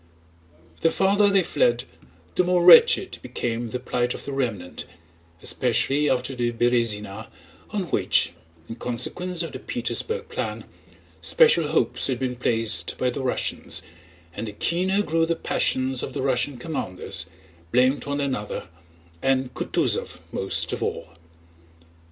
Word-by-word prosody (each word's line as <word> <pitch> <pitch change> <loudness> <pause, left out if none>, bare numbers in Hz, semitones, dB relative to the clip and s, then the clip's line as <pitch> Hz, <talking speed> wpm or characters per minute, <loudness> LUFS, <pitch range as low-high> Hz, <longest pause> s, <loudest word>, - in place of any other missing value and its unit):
The 165 - +3
farther 200 +3 +3
they 195 -2 +3
fled - - +1 0.5
the 180 - +2
more 180 -1 +2
wretched 465 -5 +7
became 120 -2 -3
the 125 - -3
plight 125 -1 -1
of - - -9
the 140 - -4
remnant, 115 -10 -3 0.6
especially 135 +4 +2
after 130 +1 0
the 120 -2 -1
Berëzina, 110 -3 0 0.4
on 210 -2 -2
which - - +2 0.3
(in 115 - -7
consequence 165 +10 -1
of 165 - -5
the - - -7
Petersburg 465 +1 -2
plan) - - -4 0.6
special 480 -1 +4
hopes - - +2
had 130 -2 -1
been 125 0 -2
placed 115 -2 0
by 125 -1 +1
the 135 - -4
Russians, 130 -1 -1 0.5
and 110 +5 -5
the 105 - -6
keener 185 - 0
grew 165 -2 +1
the 170 - +1
passions 130 -4 0
of - - -5
the - - -3
Russian 130 0 0
commanders, 120 - -5 0.3
who 85 - -28
blamed 130 +3 +3
one 140 0 -1
another 130 -9 -3 0.5
and 130 -1 +1
Kutúzov - - -1
most 95 - -2
of - - -4
all. - - -3
130 Hz, 140 wpm, -24 LUFS, 120-170 Hz, 0.6 s, wretched